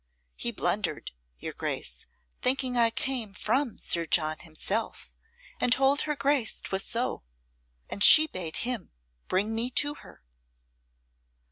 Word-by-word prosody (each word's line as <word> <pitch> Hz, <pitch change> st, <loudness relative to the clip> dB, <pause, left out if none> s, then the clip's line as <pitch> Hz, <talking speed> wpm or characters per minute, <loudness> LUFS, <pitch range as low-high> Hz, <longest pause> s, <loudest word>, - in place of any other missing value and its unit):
He -, -, -2 dB
blundered, -, -, -2 dB, 0.3 s
your -, -, -7 dB
Grace, -, -, -3 dB, 0.3 s
thinking 255 Hz, 0 st, 0 dB
I 235 Hz, -1 st, +4 dB
came 230 Hz, -3 st, -3 dB
from 245 Hz, +3 st, -1 dB
Sir 170 Hz, -1 st, +1 dB
John 155 Hz, -1 st, +1 dB
himself, 160 Hz, -2 st, -4 dB, 0.5 s
and 245 Hz, -, 0 dB
told 270 Hz, +3 st, +3 dB
her 300 Hz, -1 st, -2 dB
Grace 275 Hz, -5 st, 0 dB
'twas 190 Hz, 0 st, -3 dB
so. 240 Hz, +2 st, -3 dB, 0.7 s
And 200 Hz, -, -2 dB
she 310 Hz, -, +10 dB
bade 180 Hz, -, -5 dB
him 245 Hz, -6 st, -4 dB, 0.3 s
bring 205 Hz, +4 st, -1 dB
me 230 Hz, +2 st, 0 dB
to 290 Hz, 0 st, +2 dB
her." 290 Hz, -, -17 dB
230 Hz, 130 wpm, -27 LUFS, 185-270 Hz, 0.7 s, she